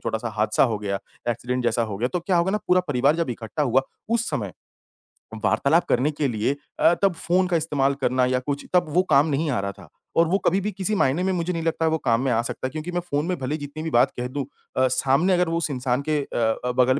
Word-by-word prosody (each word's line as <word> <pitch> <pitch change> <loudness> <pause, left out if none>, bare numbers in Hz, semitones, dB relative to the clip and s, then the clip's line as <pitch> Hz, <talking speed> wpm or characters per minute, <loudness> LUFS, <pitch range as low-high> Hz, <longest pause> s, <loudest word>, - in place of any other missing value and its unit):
छोटा 110 0 -1
सा 120 - -4
हादसा 105 0 +2
हो 110 -4 -1
गया, 100 -2 -2 0.3
एक्सीडेंट 125 +2 -2
जैसा 115 0 +2
हो 105 -3 -4
गया, 125 +2 0
तो 180 - -2
क्या 180 +1 0
होगा 170 +2 +2
ना 210 - 0
पूरा 180 0 +5
परिवार 140 +3 +2
जब 165 -6 -1
इकट्ठा 120 +6 -4
हुआ, 130 0 +3 0.3
उस 230 0 0
समय 100 -6 -3 0.9
वार्तालाप 140 +11 +3
करने 130 +5 +2
के 145 -1 -1
लिए 115 +4 0 0.2
अ, 170 - +5
तब 195 - +4
फ़ोन 180 +3 +1
का 175 -2 +2
इस्तेमाल 140 -3 +1
करना 125 0 +2
या 125 0 +1
कुछ, 140 +2 -4
तब 175 -1 +4
वो 180 +1 +4
काम 140 +3 +5
नहीं 150 +1 0
आ 120 - 0
रहा 100 0 -3
था 100 -5 -15 0.3
और 165 0 +5
वो 190 +4 +2
कभी-भी 195 +4 +1
किसी 195 +2 -2
मायने 160 +1 +2
में 190 - +1
मुझे 175 0 -1
नहीं 165 - -2
लगता 165 0 0
वो 160 - +2
काम 115 0 +3
में 135 -2 0
आ 115 - +2
सकता 130 - -4
है, - - -8
क्योंकि 155 +4 -5
मैं 175 - -1
फ़ोन 150 -3 -2
में 180 0 -1
भले 135 +4 -2
जितनी 145 +2 -7
भी 160 - -2
बात 120 - +4
कह 125 - -2
दूँ 135 0 -4 0.3
अ, 130 0 +4
सामने 140 +9 +2
अगर 180 -1 +2
वो 165 - 0
उस 165 - -1
इंसान 125 0 -1
के 150 - +2
अ - - -6 0.3
अ, 125 - +1
बगल 130 +2 +4
145 Hz, 260 wpm, -24 LUFS, 125-170 Hz, 0.9 s, पूरा